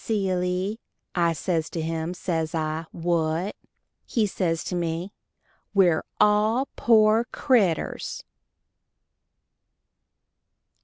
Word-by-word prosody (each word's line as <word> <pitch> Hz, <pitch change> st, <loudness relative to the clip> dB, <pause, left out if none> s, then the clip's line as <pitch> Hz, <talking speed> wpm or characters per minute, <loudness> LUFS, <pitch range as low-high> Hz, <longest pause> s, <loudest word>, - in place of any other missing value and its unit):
"Silly." 190 Hz, -1 st, -1 dB, 0.3 s
I 170 Hz, -2 st, +2 dB
says 165 Hz, 0 st, -1 dB
to 170 Hz, -, -5 dB
him, 165 Hz, +2 st, -2 dB
says 165 Hz, -2 st, -2 dB
I, 160 Hz, 0 st, -2 dB
"What?" 170 Hz, +2 st, -1 dB, 0.5 s
He 225 Hz, -4 st, 0 dB
says 165 Hz, -5 st, -1 dB
to -, -, -4 dB
me, 170 Hz, +2 st, -2 dB, 0.6 s
"_We're 180 Hz, -5 st, +4 dB, 0.2 s
all 215 Hz, +5 st, +3 dB
poor 220 Hz, 0 st, +4 dB
critters! 225 Hz, -, 0 dB
180 Hz, 90 wpm, -25 LUFS, 165-210 Hz, 0.6 s, We're